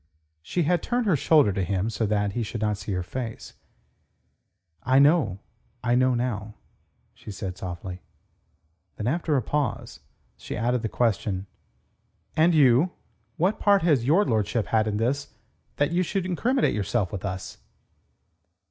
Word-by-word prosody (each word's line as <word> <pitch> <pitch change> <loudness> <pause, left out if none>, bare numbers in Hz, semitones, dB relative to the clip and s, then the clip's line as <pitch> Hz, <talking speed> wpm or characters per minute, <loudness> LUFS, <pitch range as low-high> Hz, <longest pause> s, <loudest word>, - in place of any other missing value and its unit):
She 165 - -1
had 175 +2 +1
turned 245 -1 -1
her 190 -6 +3
shoulder 145 -6 +4
to 95 - -1
him 95 +4 -1
so 110 0 -1
that 105 -1 0
he 120 - -3
should 110 +1 -4
not 105 -2 0
see - - -6
her 90 -1 -1
face. 115 +4 -6 1.3
"I 130 +2 +2
know. 140 - +4 0.5
I 120 - +1
know 130 0 +3
now," 110 -3 -3 0.6
she - - -13
said 95 -2 -5
softly. 90 0 -7 0.9
Then 105 - -5
after 155 +3 +1
a 130 - 0
pause 145 +4 -2 0.4
she - - -6
added 120 +2 0
the 110 - -2
question: 100 -5 0 0.9
"And 165 +2 +4
you? 145 +4 +4 0.4
What 185 +6 +1
part 200 -3 +4
has 150 -8 +3
your 165 +11 +3
lordship 110 0 0
had 110 -1 +1
in 105 -1 -1
this 130 +5 -2 0.4
that 145 +3 +1
you 175 +2 +2
should 185 +1 -1
incriminate 235 - +1
yourself 100 -1 -1
with 100 -3 -5
us?" 95 -2 -5
120 Hz, 155 wpm, -25 LUFS, 105-155 Hz, 1.3 s, shoulder